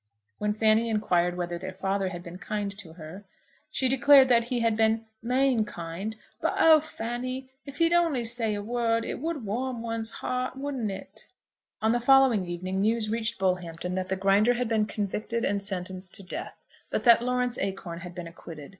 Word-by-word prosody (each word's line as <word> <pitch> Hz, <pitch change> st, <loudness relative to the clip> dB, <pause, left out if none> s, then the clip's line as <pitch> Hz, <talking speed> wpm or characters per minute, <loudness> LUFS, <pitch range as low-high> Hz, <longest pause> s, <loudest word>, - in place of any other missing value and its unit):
When 210 Hz, 0 st, 0 dB
Fanny 220 Hz, +1 st, +3 dB
inquired 180 Hz, -5 st, +1 dB
whether 175 Hz, -1 st, -3 dB
their 190 Hz, +1 st, -7 dB
father 195 Hz, 0 st, -1 dB
had 175 Hz, -1 st, -7 dB
been 175 Hz, +1 st, -9 dB
kind 205 Hz, 0 st, -3 dB
to 180 Hz, -6 st, -9 dB
her, 165 Hz, +4 st, -10 dB, 0.5 s
she 260 Hz, -, 0 dB
declared 270 Hz, +1 st, +6 dB
that 235 Hz, -2 st, +4 dB
he 245 Hz, -1 st, -1 dB
had 230 Hz, -1 st, +2 dB
been 225 Hz, 0 st, +2 dB, 0.2 s
"main 250 Hz, 0 st, +2 dB
kind." 185 Hz, +2 st, -6 dB, 0.3 s
"But, -, -, 0 dB
oh, 320 Hz, -1 st, +7 dB
Fanny! 255 Hz, -2 st, -5 dB, 0.2 s
if 280 Hz, 0 st, -8 dB
he'd 335 Hz, +1 st, +3 dB
only 330 Hz, -8 st, +2 dB
say 225 Hz, -2 st, 0 dB
a 205 Hz, -, -4 dB
word, 230 Hz, 0 st, 0 dB
it -, -, -4 dB
would 310 Hz, -4 st, -3 dB
warm 240 Hz, +3 st, -3 dB
one's 225 Hz, -1 st, -1 dB
heart; 255 Hz, +1 st, -3 dB
wouldn't 270 Hz, -5 st, -3 dB
it?" 195 Hz, -, -8 dB, 0.6 s
On 220 Hz, -, +4 dB
the 240 Hz, -, +2 dB
following 245 Hz, -6 st, +5 dB
evening 185 Hz, +2 st, -3 dB
news 215 Hz, 0 st, +1 dB
reached 230 Hz, 0 st, -1 dB
Bullhampton 180 Hz, -2 st, -1 dB
that 185 Hz, 0 st, -2 dB
the 190 Hz, -, +1 dB
Grinder 200 Hz, +5 st, +3 dB
had 245 Hz, 0 st, -1 dB
been 220 Hz, -2 st, +1 dB
convicted 215 Hz, +3 st, -2 dB
and 200 Hz, 0 st, 0 dB
sentenced 185 Hz, -1 st, -5 dB
to 200 Hz, -, -6 dB
death, 180 Hz, -, -7 dB, 0.3 s
but -, -, -1 dB
that 235 Hz, -1 st, +7 dB
Lawrence 250 Hz, 0 st, 0 dB
Acorn 190 Hz, -3 st, -4 dB
had 175 Hz, 0 st, -9 dB
been 175 Hz, -2 st, -6 dB
acquitted. 165 Hz, -3 st, -10 dB
220 Hz, 190 wpm, -27 LUFS, 190-245 Hz, 0.6 s, oh